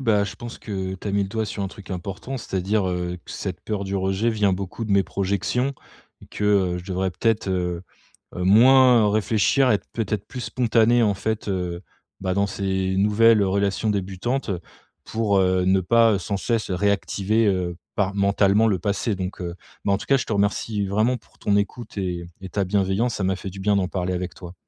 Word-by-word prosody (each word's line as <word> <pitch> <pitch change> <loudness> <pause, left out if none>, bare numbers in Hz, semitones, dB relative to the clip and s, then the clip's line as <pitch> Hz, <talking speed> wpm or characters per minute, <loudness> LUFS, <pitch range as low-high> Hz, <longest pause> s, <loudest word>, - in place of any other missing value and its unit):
bah, 105 -5 +2
je 100 - -6
pense 120 0 -8
que 95 -3 -4
tu 95 - -9
as - - -1
mis 100 0 +2
le 95 - -3
doigt 110 +2 -2
sur 100 0 -4
un 95 - -2
truc 100 +1 -12
important. 100 +8 -5
C'est-à-dire, 95 -1 -1
heu, 90 0 -3
que - - -12
cette - - -5
peur 100 -2 -3
du 95 +1 -4
rejet 95 +4 0
vient 105 -3 +2
beaucoup 95 +4 -4
de 105 - -1
mes 100 0 +5
projections. 100 +9 -1 0.5
Et - - -13
que, 105 - -5
heu, 95 -4 +2
je 90 - -9
devrais 95 0 -1
peut-être, 110 +1 0
heu, 90 -1 -1 0.5
moins 115 +4 +6
réfléchir 110 +5 +2
et - - +5
être - - -6
peut-être 105 -3 -2
plus 125 - -7
spontané 120 -1 +2
en 105 -3 +3
fait, 110 +2 -3
heu, 90 -2 -2 0.4
bah 95 -1 -1
dans 100 +1 +1
ces 95 -1 -1
nouvelles 105 +2 +5
relations 100 +2 0
débutantes. 100 +5 -2 0.5
Pour, 110 -3 0
heu, 95 -1 +2
ne 95 +1 +3
pas 110 +1 +4
sans 100 +2 -3
cesse 115 +2 -1
réactiver, 100 +3 +1
heu, 90 -3 0 0.2
par 100 -1 0
mentalement 100 +2 +3
le 100 -4 +2
passé 100 +3 -1
donc, 95 0 -5
heu. 85 -1 -5 0.3
Mais 100 - +2
en 100 - +2
tout - - -8
cas 135 - +4
je 130 - -3
te 110 - -2
remercie 100 +1 0
vraiment 110 +6 +1
pour 120 - -15
ton 100 - +1
écoute 105 +2 -2
et 90 -3 -3
et 95 - -7
ta 100 0 -1
bienveillance, 100 +5 +1
ça 95 - -3
m'a 95 0 0
fait 95 - -6
du 95 +1 -9
bien 100 0 +2
d'en 95 -2 +1
parler 90 -1 -2
avec 90 -1 -3
toi. 85 -2 -10
100 Hz, 210 wpm, -23 LUFS, 95-110 Hz, 0.5 s, moins